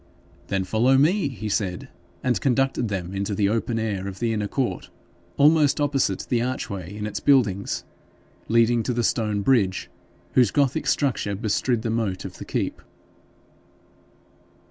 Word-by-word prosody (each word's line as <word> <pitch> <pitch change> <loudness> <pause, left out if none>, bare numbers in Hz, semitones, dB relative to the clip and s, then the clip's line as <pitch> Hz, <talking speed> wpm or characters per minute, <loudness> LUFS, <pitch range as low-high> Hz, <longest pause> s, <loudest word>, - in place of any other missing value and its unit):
'Then 95 -1 0
follow 120 +7 +3
me,' 165 +5 +3
he 120 -5 -6
said, 95 -4 -2 0.4
and 125 -3 +1
conducted 135 -2 +1
them 95 -3 -4
into 100 +1 -2
the 100 0 +2
open 115 +2 -1
air 100 -4 -2
of 95 -1 -6
the 115 +1 0
inner 105 -2 -1
court, 130 +3 -2 0.5
almost 150 -1 +4
opposite 135 -9 +1
the 120 -2 +1
archway 100 -7 -4
in 105 - -4
its 105 - -4
buildings 110 -9 +2 0.6
leading 115 +1 +3
to 125 - -2
the 120 - 0
stone 105 -3 0
bridge, 100 -8 +1 0.4
whose 125 -4 +5
gothic 140 +4 +1
structure 120 -8 0
bestrid 110 +2 0
the 115 - -1
moat 105 -5 -2
of 90 -2 -8
the - - -7
keep. - - -3
115 Hz, 150 wpm, -24 LUFS, 100-130 Hz, 0.6 s, whose